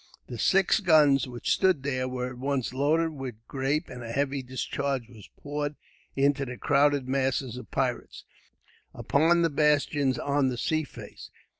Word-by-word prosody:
The 120 Hz, -, -8 dB
six 195 Hz, +2 st, +3 dB
guns, 150 Hz, -, +4 dB
which 120 Hz, -1 st, -3 dB
stood 185 Hz, -8 st, +2 dB
there, 130 Hz, -2 st, -1 dB
were 125 Hz, -1 st, -3 dB
at 125 Hz, -, -11 dB
once 135 Hz, -2 st, -2 dB
loaded 155 Hz, +5 st, +1 dB
with 135 Hz, -5 st, -6 dB
grape; 140 Hz, +4 st, -1 dB
and 125 Hz, -, -9 dB
a 115 Hz, -, -6 dB
heavy 140 Hz, +2 st, -1 dB
discharge 130 Hz, 0 st, -3 dB
was 110 Hz, -5 st, -15 dB
poured 145 Hz, 0 st, -4 dB, 0.4 s
into 140 Hz, 0 st, +2 dB
the 125 Hz, -2 st, -6 dB
crowded 145 Hz, -2 st, +2 dB
masses 130 Hz, -2 st, -1 dB
of 125 Hz, -4 st, -9 dB
pirates, -, -, -3 dB, 0.7 s
upon 170 Hz, +4 st, +2 dB
the 165 Hz, -, +3 dB
bastions 145 Hz, -2 st, +2 dB
on 140 Hz, 0 st, +1 dB
the 125 Hz, -, -4 dB
sea 155 Hz, +5 st, 0 dB
face. -, -, -11 dB
140 Hz, 160 wpm, -27 LUFS, 130-145 Hz, 0.7 s, guns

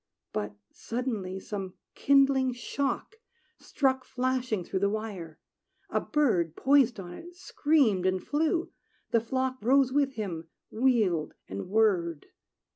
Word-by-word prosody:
But 105 Hz, 0 st, -3 dB, 0.2 s
suddenly 220 Hz, -6 st, -4 dB
some 195 Hz, -2 st, -6 dB, 0.2 s
kindling 275 Hz, -2 st, +3 dB
shock 275 Hz, -, -3 dB, 0.4 s
Struck 265 Hz, -2 st, 0 dB
flashing 255 Hz, -6 st, -1 dB
through 190 Hz, -, -2 dB
the 200 Hz, +1 st, +2 dB
wire: 200 Hz, -7 st, -5 dB, 0.5 s
a -, -, +2 dB
bird, 180 Hz, -, +1 dB
Poised 265 Hz, -4 st, +3 dB
on 175 Hz, -2 st, -7 dB
it, 345 Hz, -, -11 dB
screamed 280 Hz, -, +2 dB
and 185 Hz, 0 st, +1 dB
flew; 320 Hz, +3 st, 0 dB, 0.4 s
the 230 Hz, -, +3 dB
flock 260 Hz, +2 st, -1 dB
Rose 260 Hz, +3 st, +3 dB
with 280 Hz, -1 st, +2 dB
him, 175 Hz, -8 st, -5 dB, 0.2 s
wheeled, 215 Hz, -10 st, +1 dB
and 100 Hz, -, -6 dB
whirred. 185 Hz, -7 st, +2 dB
230 Hz, 120 wpm, -29 LUFS, 185-270 Hz, 0.5 s, kindling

